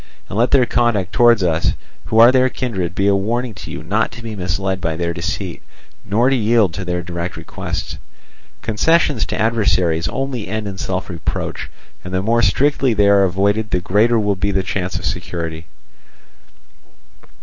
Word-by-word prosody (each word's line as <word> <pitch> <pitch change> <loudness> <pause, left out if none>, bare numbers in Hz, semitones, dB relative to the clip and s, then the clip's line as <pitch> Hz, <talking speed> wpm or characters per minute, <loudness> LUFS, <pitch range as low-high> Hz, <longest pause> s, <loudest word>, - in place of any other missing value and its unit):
And - - -6
let 120 - +3
their 130 -3 +4
conduct 115 -7 0
towards 120 -4 +5
us 85 -2 +1 0.3
who 110 - -1
are 115 +2 +8
their 130 0 +3
kindred 95 -10 -3
be 100 - 0
a 100 - +4
warning 115 +5 -1
to 90 - -10
you 75 - -6
not 100 +8 0
to 120 +1 -10
be 110 -2 -6
misled 95 0 -2
by 80 -1 -1
their 85 +1 -2
deceit, 85 +1 -4 0.4
nor 115 +6 +2
to - - +3
yield 110 -5 +2
to 95 - -5
their 90 -1 -2
direct 85 0 -5
requests; - - -5 0.6
concessions 140 +3 +2
to - - -3
adversaries 95 -7 +1
only 135 -5 -3
end 110 -1 -3
in 95 -1 -6
self 95 0 -3
reproach, 85 -2 -4 0.3
and 90 0 -5
the 95 - 0
more 115 +3 +2
strictly 135 0 +2
they 100 -1 +4
are 100 -1 +5
avoided 100 +4 0
the 90 - +1
greater 110 +6 +2
will 105 -1 +1
be 100 +2 -1
the 95 -1 0
chance 95 -1 -3
of 90 - -6
security. 85 -2 -4
100 Hz, 180 wpm, -19 LUFS, 90-115 Hz, 0.6 s, are